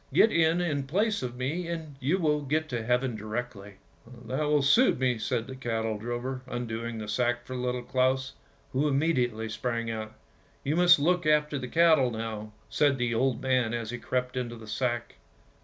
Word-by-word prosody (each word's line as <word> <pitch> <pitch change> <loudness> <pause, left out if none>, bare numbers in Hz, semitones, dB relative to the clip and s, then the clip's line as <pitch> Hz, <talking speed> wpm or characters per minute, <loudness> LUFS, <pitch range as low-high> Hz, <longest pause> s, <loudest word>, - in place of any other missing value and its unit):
" - - -22
Get 225 - +6
in 165 +1 +3
in 145 -6 -1
place 205 +8 +1
of 125 -1 -4
me, 150 +8 -2
and 160 -4 -5
you 145 +8 +1
will 150 -4 +1
get 155 +3 -1
to 115 -2 -1
heaven 125 +1 +1
directly! 110 -2 -5
' - - -33
' - - -22
''' 120 -1 -13
That 130 - -3
will 150 0 +3
just 140 +1 +4
suit 255 +2 +4
me," 125 -3 +1
said 115 0 -1
the 130 - -8
cattle 115 -4 -2
drover, 120 +3 -4
undoing 115 -2 -4
the 110 -1 -6
sack 120 +2 0
for 130 - -6
Little 125 0 -2
Claus, 130 +1 +1 0.4
who 140 +3 +2
immediately 130 -6 +1
sprang 115 +1 -2
out. 110 -1 -6 0.2
" - - -34
You 145 +3 0
must 175 0 +7
look 175 +3 +1
after 150 -1 +2
the 125 - -5
cattle 160 -4 +4
now," 110 -2 -5 0.2
said 145 -3 +2
the 120 -2 0
old 125 +1 0
man 125 -3 +1
as 115 -1 -4
he 120 - -5
crept 125 +1 -2
into 120 -2 -3
the 110 -1 -11
sack. 120 +2 -2
125 Hz, 205 wpm, -28 LUFS, 115-145 Hz, 0.4 s, must